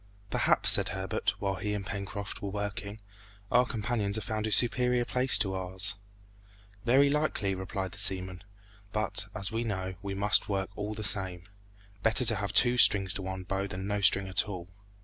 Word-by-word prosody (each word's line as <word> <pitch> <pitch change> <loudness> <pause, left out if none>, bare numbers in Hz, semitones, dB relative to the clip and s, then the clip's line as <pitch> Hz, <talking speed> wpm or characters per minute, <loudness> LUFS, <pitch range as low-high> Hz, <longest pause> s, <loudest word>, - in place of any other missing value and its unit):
"Perhaps," - - +4
said - - +4
Herbert, 95 +1 -3
while 95 -2 -2
he 105 +3 -3
and 100 -1 -5
Pencroft 100 +1 -6
were 100 - -4
working, 100 +1 -6 0.5
"our 125 +1 +3
companions 110 -4 -2
have 110 -2 -3
found 110 -1 -3
a - - -4
superior 125 +2 +3
place 125 +2 +2
to 95 -3 -1
ours." 95 0 -3 0.9
"Very 130 +4 +4
likely," 140 -9 -1
replied 95 0 -5
the 100 - -8
seaman; 95 -1 -1 0.5
"but, 110 0 -1
as 100 0 +1
we 115 +1 -2
don't 120 - -4
know, 95 -2 -4
we 100 0 -5
must 100 0 +1
work 95 -1 -3
all 105 +1 -5
the 110 - -6
same. 95 -5 +1 0.6
Better 110 +3 +5
to - - +7
have 100 -2 -3
two 120 +3 +4
strings 95 -5 +5
to - - -5
one's 95 0 -6
bow 95 +1 -3
than 95 0 -6
no 100 0 -2
string 100 0 +4
at 95 +3 +1
all!" 90 -3 -8
100 Hz, 190 wpm, -29 LUFS, 95-110 Hz, 0.9 s, to